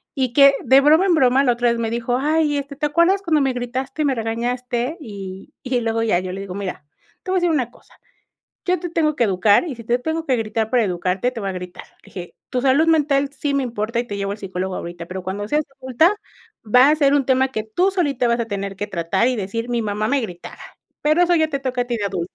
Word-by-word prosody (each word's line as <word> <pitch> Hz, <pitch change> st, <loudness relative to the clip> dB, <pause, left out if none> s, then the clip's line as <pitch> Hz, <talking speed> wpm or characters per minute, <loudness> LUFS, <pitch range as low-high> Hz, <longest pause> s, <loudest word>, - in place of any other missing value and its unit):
y 260 Hz, -4 st, -1 dB
que, 275 Hz, 0 st, +7 dB
de 265 Hz, +1 st, +6 dB
broma 310 Hz, +6 st, +5 dB
en 375 Hz, -, +3 dB
broma 265 Hz, -2 st, +4 dB
la 250 Hz, -, +3 dB
otra 240 Hz, 0 st, +1 dB
vez 235 Hz, -, 0 dB
me 225 Hz, -1 st, -2 dB
dijo: 240 Hz, +1 st, -1 dB
"Ay, 300 Hz, +1 st, +1 dB
este, 280 Hz, 0 st, -5 dB
¿te 295 Hz, +2 st, -1 dB
acuerdas 340 Hz, +6 st, +3 dB
como 330 Hz, -6 st, +1 dB
me 270 Hz, -2 st, +1 dB
gritaste 255 Hz, +4 st, -4 dB
y -, -, +2 dB
me 275 Hz, -2 st, +1 dB
regañaste?". 245 Hz, +4 st, -2 dB
Y 195 Hz, -6 st, -9 dB
y 255 Hz, -1 st, 0 dB
luego 225 Hz, 0 st, -1 dB
ya, 215 Hz, -6 st, +2 dB
yo 185 Hz, 0 st, -5 dB
le 190 Hz, +1 st, -6 dB
digo: 190 Hz, -2 st, -7 dB
"Mira, 190 Hz, -7 st, -5 dB, 0.4 s
te 375 Hz, -, -9 dB
voy 375 Hz, -, +2 dB
a -, -, +3 dB
decir 350 Hz, -1 st, +2 dB
una 260 Hz, -7 st, 0 dB
cosa, -, -, -23 dB, 0.7 s
yo 365 Hz, -1 st, +1 dB
te 350 Hz, -, -4 dB
tengo 310 Hz, -2 st, +1 dB
que 235 Hz, -, +2 dB
educar 200 Hz, -, +3 dB
y 270 Hz, -, -5 dB
si 230 Hz, -, -11 dB
te 235 Hz, +2 st, +1 dB
tengo 320 Hz, +4 st, -3 dB
que 260 Hz, -2 st, +2 dB
gritar 220 Hz, 0 st, -2 dB
para 250 Hz, -2 st, +3 dB
educarte 185 Hz, +4 st, -1 dB
te 250 Hz, -, -8 dB
voy 200 Hz, -, -3 dB
a -, -, -4 dB
gritar.", 180 Hz, -1 st, -8 dB, 0.2 s
le -, -, -21 dB
dije, 175 Hz, -2 st, -9 dB, 0.2 s
"Tu 255 Hz, -, 0 dB
salud 275 Hz, +5 st, +3 dB
mental 285 Hz, -3 st, +2 dB
sí 285 Hz, 0 st, -2 dB
me 275 Hz, -, +1 dB
importa 230 Hz, -1 st, -2 dB
y -, -, -4 dB
te 205 Hz, -, -5 dB
llevo 200 Hz, 0 st, -2 dB
al 205 Hz, -, -7 dB
psicólogo 190 Hz, -1 st, -4 dB
ahorita, 170 Hz, 0 st, -7 dB
pero 185 Hz, +1 st, -6 dB
cuando 195 Hz, +3 st, -4 dB
seas 300 Hz, +6 st, 0 dB, 0.2 s
adulta, 265 Hz, -, +2 dB, 0.5 s
va 250 Hz, +5 st, +5 dB
a 305 Hz, -, +3 dB
ser 285 Hz, -2 st, +3 dB
un 280 Hz, -2 st, +2 dB
tema 260 Hz, 0 st, +2 dB
que 215 Hz, -4 st, -2 dB
tú 355 Hz, -, +1 dB
solita 285 Hz, -10 st, 0 dB
vas 235 Hz, 0 st, +1 dB
a 230 Hz, -, -2 dB
tener 200 Hz, -2 st, -4 dB
que 205 Hz, +2 st, -5 dB
tratar 170 Hz, +5 st, 0 dB
y 255 Hz, -, -1 dB
decir 225 Hz, +4 st, -4 dB
mi 240 Hz, -1 st, 0 dB
mamá 210 Hz, 0 st, -2 dB
me 280 Hz, +2 st, +2 dB
gritaba, 180 Hz, -7 st, -8 dB, 0.4 s
pero 305 Hz, +4 st, +3 dB
eso 350 Hz, -1 st, +3 dB
ya 315 Hz, -, +3 dB
te 275 Hz, -2 st, -3 dB
toca 260 Hz, -2 st, -1 dB
a -, -, -5 dB
ti 245 Hz, -1 st, -2 dB
de 205 Hz, -, -2 dB
adulta", 180 Hz, -3 st, -3 dB
245 Hz, 265 wpm, -21 LUFS, 205-285 Hz, 0.7 s, que